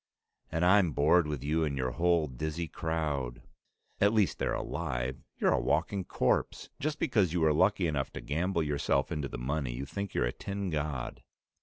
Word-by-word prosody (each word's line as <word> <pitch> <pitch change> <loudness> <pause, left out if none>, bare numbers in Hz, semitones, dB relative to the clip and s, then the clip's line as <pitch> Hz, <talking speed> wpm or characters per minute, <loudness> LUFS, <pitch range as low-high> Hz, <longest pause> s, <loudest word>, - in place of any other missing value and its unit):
"And 80 +2 +1
I'm 90 -3 +5
bored 75 +3 +4
with 75 -4 -3
you 80 +3 +1
and 70 -3 -1
your 65 -1 -1
whole 85 +2 +2
dizzy 80 +5 -4
crowd." 70 -7 -2 0.6
"At 100 +2 +4
least 105 -4 +2
they're - - 0
alive. 65 +2 -3 0.2
You're - - +3
a - - +2
walking 100 -3 0
corpse. - - 0
Just 155 +1 -1
because 105 - +2
you 90 - +1
were 80 -1 +4
lucky 95 +3 +3
enough 75 -4 -1
to - - -6
gamble 85 +2 0
yourself 70 -1 0
into 75 -4 -2
the 60 - -6
money, 65 +1 -2
you 65 +3 -4
think 100 +7 -5
you're - - +2
a - - -2
tin 100 -2 -4
god." 70 -5 -3
80 Hz, 185 wpm, -30 LUFS, 70-90 Hz, 0.6 s, I'm